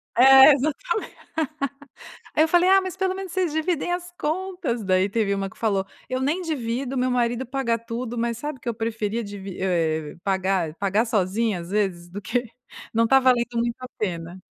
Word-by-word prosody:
É, 265 +3 +9
exatamente, 310 - -2 1.2
eu 315 +1 +5
falei: 350 +2 +4
"Ah, 385 +1 +7
mas 375 0 -5
pelo 380 -1 0
menos 385 -2 -6
vocês 365 -4 0
dividem 315 +2 -1
as 355 0 -4
contas", 325 - -2
daí 185 0 +2
teve 205 -1 0
uma 195 0 -2
que - - -19
falou: 200 -4 +1 0.2
"Eu 255 0 -2
nem 310 +8 0
divido, 265 -4 -2
o - - -1
meu 255 0 +1
marido 240 0 0
pagar 250 -3 0
tudo, 235 +1 -5
mas 235 0 -1
sabe 295 -2 -5
que 240 - -6
eu 235 - -1
preferia 225 0 -2
divi 200 -2 -8
eh, 160 -5 0
pagar 190 -4 0
pagar 200 +4 +1
sozinha 210 -2 0
às 170 +2 -9
vezes, 190 -4 -1
do 195 +4 -7
que 245 +4 -1 0.5
não 230 0 +4
tá 270 +3 +6
valendo 245 -2 +2
muito 235 0 0
a 255 - -6
pena. 175 -2 -4
235 Hz, 185 wpm, -24 LUFS, 200-285 Hz, 1.2 s, É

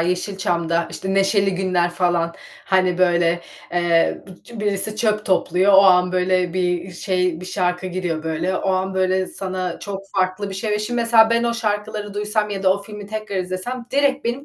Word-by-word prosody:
Yeşilçam'da, 175 -2 -1
işte, 190 0 -4
Neşeli 195 0 +2
Günler 180 -2 +1
falan, 175 -1 0 0.3
hani, 185 -2 +2
böyle, 175 -1 +2 0.3
eee, 175 -1 +1 0.3
d 230 -3 -8
birisi 210 +1 -1
çöp 215 -1 0
topluyor, 185 +1 +2
o 190 - +8
an, 180 -1 +5
böyle, 185 -1 +1
bir 180 0 -1
şey, 180 -1 -1
bir 180 - -8
şarkı 180 -1 -1
giriyor, 175 -3 -3
böyle, 165 +4 -1
o 195 - -1
an, 190 0 -1
böyle, 185 0 +1
sana 185 -2 -4
çok 200 -1 -6 0.2
farklı 185 +2 0
bir - - -6
şey 210 +3 -3
Ve 210 - +1
şimdi 240 +3 -2
mesela 230 -1 +5
ben 235 +1 +2
o 235 - 0
şarkıları 210 -2 -3
duysam 210 +1 -1
ya 195 -1 -4
da 190 -1 +5
o 200 +1 -5
filmi 210 0 -9
tekrar 215 -1 -5
izlesem 185 +7 -4
direkt 280 -1 +1
benim 245 +4 -2
190 Hz, 185 wpm, -21 LUFS, 180-210 Hz, 0.3 s, o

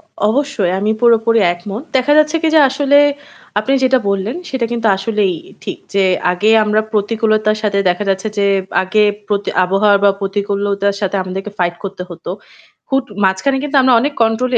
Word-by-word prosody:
অ - - -27 0.3
অবশ্যই 245 -7 0
আমি 210 +2 0
পুরোপুরি 230 -1 +3
একমত। 200 +6 -7
দেখা 260 +3 +2
যাচ্ছে 305 +1 +3
কি? 325 - +2
যে 315 - +6
আসলে 285 +1 +3 0.6
আপনি 215 +6 -1
যেটা 260 0 +3
বললেন 200 - -2
সেটা 260 -3 -1
কিন্তু 230 -1 -2
আসলেই 200 -1 0 0.2
এ - - -17
ঠিক। - - -5 0.2
যে 195 -1 +3 0.3
আগে 205 +5 +1
আমরা 210 0 +1
প্রতিকূলতার 215 0 0
সাথে 200 -2 0
দেখা 180 +3 -1
যাচ্ছে 195 +2 -1
যে 200 - +2 0.4
আগে 190 +3 +1 0.3
পতি 205 -1 -1 0.2
আবহাওয়া 200 +2 +3
বা 200 - +6
প্রতিকূলতার 200 0 -1
সাথে 200 -1 -1
আমাদেরকে 190 +2 -6
fight 175 -1 -1
করতে 195 -2 -6
হতো। 170 0 -8 0.6
হুট 270 -1 0 0.2
মাঝখানে 190 +9 +1
কিন্তু 295 0 -2
আমরা 255 -1 +4
অনেক 285 +4 -1
control 225 +3 0
210 Hz, 175 wpm, -16 LUFS, 195-245 Hz, 0.6 s, যে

